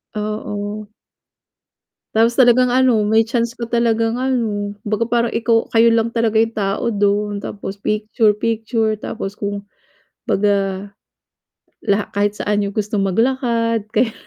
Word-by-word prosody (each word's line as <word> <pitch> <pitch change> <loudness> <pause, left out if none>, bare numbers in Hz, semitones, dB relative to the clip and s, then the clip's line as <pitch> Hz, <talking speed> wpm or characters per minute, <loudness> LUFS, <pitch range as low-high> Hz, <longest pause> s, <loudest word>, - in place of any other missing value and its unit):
Oo. 210 0 -4 1.3
Tapos 230 +2 +3
talagang 250 0 +5
ano, 245 -4 +3
may 220 +1 +4
chance 235 +1 -2
ka 235 - -6
talagang 230 0 +1
ano, 220 -6 -1
baga 215 +2 -1
parang 235 -1 +1
ikaw 230 0 +1
kayo 230 0 +5
lang 230 0 +1
talaga 230 -1 0
'yong 225 - -3
tao 200 +2 -1
doon, 205 0 0
tapos 200 -1 -7
picture-picture 220 +1 0
tapos 195 -3 -5
kung 200 0 -3 0.7
baga, 200 -1 0 0.9
laha 205 -1 +1
kahit 205 +1 0
saan 205 0 0
niyo 200 - -1
gustong 210 0 -2
maglakad 230 +1 0
kaya. 225 0 +3
220 Hz, 125 wpm, -19 LUFS, 205-230 Hz, 1.3 s, talagang